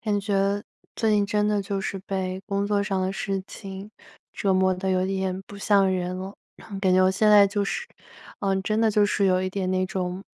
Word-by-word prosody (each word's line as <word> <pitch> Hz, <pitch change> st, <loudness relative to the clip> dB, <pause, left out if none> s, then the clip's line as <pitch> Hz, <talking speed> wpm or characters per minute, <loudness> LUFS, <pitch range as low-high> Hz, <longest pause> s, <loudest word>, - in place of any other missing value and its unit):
感 210 Hz, -2 st, 0 dB
觉 200 Hz, 0 st, 0 dB, 0.3 s
最 225 Hz, -2 st, +1 dB
近 205 Hz, -1 st, +3 dB
真 210 Hz, 0 st, +1 dB
的 210 Hz, -1 st, +1 dB
就 200 Hz, 0 st, -3 dB
是 195 Hz, 0 st, -3 dB
被 190 Hz, -1 st, -4 dB
工 200 Hz, 0 st, -1 dB
作 205 Hz, -1 st, +1 dB
上 195 Hz, -1 st, -1 dB
的 185 Hz, +1 st, -1 dB
事 195 Hz, 0 st, -3 dB
情 195 Hz, +1 st, -9 dB, 0.4 s
折 195 Hz, -2 st, 0 dB
磨 185 Hz, 0 st, +3 dB
得 185 Hz, +1 st, -3 dB
有 185 Hz, 0 st, +1 dB
点 190 Hz, 0 st, -2 dB
不 200 Hz, -, -11 dB
像 200 Hz, -1 st, +3 dB
人 180 Hz, 0 st, -2 dB
了。 190 Hz, +2 st, -6 dB, 0.2 s
然 -, -, -16 dB
后 200 Hz, -, -5 dB
感 190 Hz, -2 st, +2 dB
觉 185 Hz, -, +5 dB
我 185 Hz, -, +4 dB
现 210 Hz, +3 st, +2 dB
在 205 Hz, -1 st, +8 dB
就 205 Hz, +1 st, -1 dB
是 475 Hz, -, -3 dB, 0.5 s
嗯， 195 Hz, -1 st, 0 dB
真 215 Hz, +3 st, 0 dB
的 225 Hz, -1 st, +3 dB
就 210 Hz, 0 st, +3 dB
是 200 Hz, -1 st, +1 dB
有 185 Hz, -1 st, +2 dB
一 185 Hz, -, -2 dB
点 185 Hz, -1 st, -2 dB
那 185 Hz, 0 st, +1 dB
种 185 Hz, 0 st, -4 dB
195 Hz, 250 characters per minute, -25 LUFS, 185-205 Hz, 0.5 s, 在